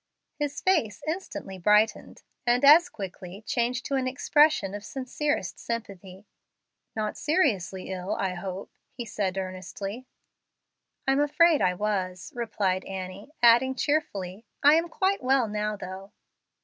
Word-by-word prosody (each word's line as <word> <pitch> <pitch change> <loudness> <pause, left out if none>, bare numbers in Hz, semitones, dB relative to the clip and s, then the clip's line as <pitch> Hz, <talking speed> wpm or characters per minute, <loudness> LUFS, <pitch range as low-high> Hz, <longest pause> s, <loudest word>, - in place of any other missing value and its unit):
His 290 -1 -2
face 310 - +1
instantly 310 - -5
brightened, 210 +4 +2 0.2
and 245 +3 +3
as 330 +5 +8
quickly 190 - -8
changed 245 +3 -1
to - - -4
an 265 -1 +1
expression 280 -5 +3
of 205 0 -6
sincerest 260 - -3
sympathy. 200 -4 -6 0.7
"Not 215 -1 -2
seriously 210 - 0
ill, 185 +1 -3
I 190 -2 -1
hope," 185 +1 -6 0.2
he 240 - -6
said, 195 -4 -2
earnestly. 195 +5 -6 1.0
"I'm 270 +1 +3
afraid 300 +2 +4
I 180 0 +2
was," 185 -2 -2
replied 200 -6 -1
Annie, 190 +4 -7
adding, 240 +3 +6
cheerfully, 205 -11 -2 0.2
"I 290 +1 +8
am 335 +2 +2
quite 385 +3 0
well 260 -2 +2
now, 210 0 -2
though." 190 0 -8
215 Hz, 130 wpm, -27 LUFS, 190-275 Hz, 1.0 s, as